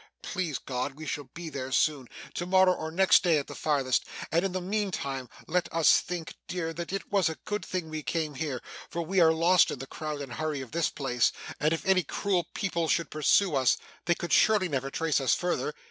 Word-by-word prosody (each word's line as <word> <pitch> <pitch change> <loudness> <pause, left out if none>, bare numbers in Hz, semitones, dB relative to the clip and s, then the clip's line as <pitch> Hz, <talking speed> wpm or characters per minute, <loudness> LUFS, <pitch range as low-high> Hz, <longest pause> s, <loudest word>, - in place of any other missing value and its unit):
Please 165 -7 -2
God, 130 +1 -4
we 155 +2 -8
shall 145 -1 -3
be 170 0 -6
there 135 -4 -5
soon 140 -1 +1 0.3
to 175 - -3
morrow 185 0 +5
or 160 -3 -4
next 190 +4 +5
day 170 -4 +4
at 140 - -1
the - - -9
farthest 135 -4 +1 0.3
and 170 +2 +2
in 195 - 0
the 185 - -2
meantime 180 - -2 0.2
let 180 +2 -1
us 165 -1 +5
think, 170 -2 -5
dear, 170 -2 -3
that 170 +1 -5
it 195 +1 -4
was 195 -4 +3
a 160 - -5
good 210 -3 -2
thing 180 -1 -3
we 155 0 -4
came 155 -1 -2
here; 140 -3 -4 0.3
for 170 - -3
we 190 +4 0
are 165 -2 +7
lost 170 +3 +4
in - - -3
the 135 - -6
crowd 150 +1 -5
and 135 -3 -6
hurry 155 +1 -2
of 130 - -9
this 170 -2 +1
place, 125 -4 +1 0.3
and 155 +1 +2
if 165 - -2
any 190 -1 +4
cruel 175 +1 -1
people 170 -4 -1
should 170 +1 0
pursue 155 +4 +3
us, 130 -3 +3 0.3
they 175 - +3
could 175 - -3
surely 210 -4 +5
never 135 -4 -2
trace 155 0 0
us 135 - +3
further. 180 - -1
160 Hz, 225 wpm, -28 LUFS, 145-180 Hz, 0.3 s, are